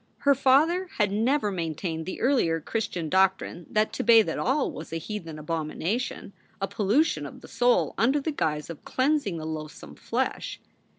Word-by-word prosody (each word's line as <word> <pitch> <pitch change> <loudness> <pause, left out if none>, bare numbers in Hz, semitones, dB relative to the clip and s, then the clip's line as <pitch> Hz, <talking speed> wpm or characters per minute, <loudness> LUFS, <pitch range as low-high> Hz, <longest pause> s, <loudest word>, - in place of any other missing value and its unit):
Her 280 0 +5
father 295 +8 +3
had 210 -3 +2
never 225 +2 +1
maintained 165 -1 -3
the 185 - -5
earlier 230 -11 +2
Chris 225 +7 -2
tian 170 -3 -4
doctrine 190 0 +1
that 215 0 +1
to - - -2
bathe 230 -2 +6
at - - -3
all 270 +3 +1
was 155 +1 -9
a 165 - -2
heathen 165 -2 -6
abomination, 165 +8 -3 0.3
a 195 - -1
pollution 200 - +1
of - - -12
the - - -12
soul 245 +1 +2
under 265 +6 +3
the 310 +3 -2
guise 150 - -2
of 165 - -11
cleansing 260 - 0
the 155 - -6
loathsome 155 -1 -7
flesh. - - -3
200 Hz, 175 wpm, -26 LUFS, 165-255 Hz, 0.3 s, bathe